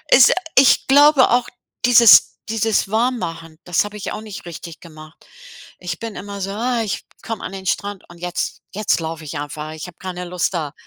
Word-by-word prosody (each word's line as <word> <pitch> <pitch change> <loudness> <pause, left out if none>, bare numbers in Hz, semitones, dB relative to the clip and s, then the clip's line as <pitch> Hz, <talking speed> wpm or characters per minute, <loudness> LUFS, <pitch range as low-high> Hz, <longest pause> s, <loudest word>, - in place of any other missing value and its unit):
Es 245 -2 +7 0.2
ich 265 0 +5
glaube 285 0 +6
auch, 245 0 +2 0.4
dieses 235 -6 +7
dieses 225 -2 0
Warmmachen, 175 -9 -2
das 175 +2 +1
habe 205 0 -8
ich 205 - -5
auch - - -6
nicht 210 -5 -10
richtig 170 0 -9
gemacht. 155 -1 -15 0.5
Ich 175 -2 -5
bin 225 -3 -7
immer 200 +1 -7
so: 195 +1 -3
„Ah, 235 +3 -1
ich 205 - -4 0.2
komme 225 -2 -6
an - - -6
den 190 -1 -8
Strand 200 +1 -3
und 175 0 -15
jetzt 180 0 -4
jetzt 210 -4 0
laufe 160 -1 -6
ich 150 0 -6
einfach. 150 +1 -6
Ich 155 +2 -7
habe 180 - -13
keine 180 -1 -6
Lust 180 +1 -2
da 150 -4 -3
190 Hz, 195 wpm, -20 LUFS, 165-225 Hz, 0.5 s, Es